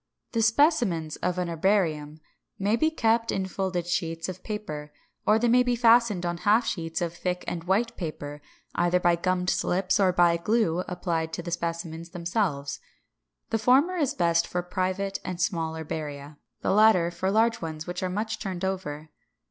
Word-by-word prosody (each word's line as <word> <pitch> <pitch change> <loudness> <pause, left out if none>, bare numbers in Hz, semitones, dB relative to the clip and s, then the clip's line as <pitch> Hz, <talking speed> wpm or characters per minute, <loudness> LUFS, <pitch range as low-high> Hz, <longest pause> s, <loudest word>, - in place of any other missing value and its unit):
The 230 - 0
specimens 220 - +2
of 180 0 -2
an 180 -1 -1
herbarium 160 -4 0 0.4
may 205 +3 +1
be 315 +7 +2
kept 230 -6 +1
in 190 - -1
folded 190 -2 -2
sheets 165 -2 -2
of 185 0 -6
paper; 155 -9 -5 0.4
or 215 - +6
they 240 +2 +1
may 245 +2 +5
be 245 -1 +1
fastened 230 -5 +4
on 175 0 -1
half 210 +6 +3
sheets 165 -2 -3
of 170 -1 -1
thick 180 +1 -3
and 170 -1 -4
white 225 +6 +1
paper, 150 -4 -6 0.3
either 175 +1 +2
by 175 -1 +3
gummed 180 +1 0
slips, 185 +2 +1
or 190 -2 +4
by 175 -1 +4
glue 180 -2 +1
applied 170 -3 -2
to 175 - -4
the 170 - -5
specimens 170 -1 -4
themselves. 170 -5 -2 0.7
The 225 - +1
former 270 +11 +4
is 290 -5 0
best 170 -5 +2
for 180 0 -2
private 185 +2 -2
and 180 -2 -5
small 165 -3 -1
herbaria; 150 -2 -6 0.2
the - - 0
latter 195 -4 +5
for 190 +2 -2
large 225 +3 +2
ones 155 -1 -5
which 175 0 -5
are 185 - -1
much 215 +3 -3
turned 190 -2 -4
over. 155 -5 -4
180 Hz, 175 wpm, -27 LUFS, 165-215 Hz, 0.7 s, or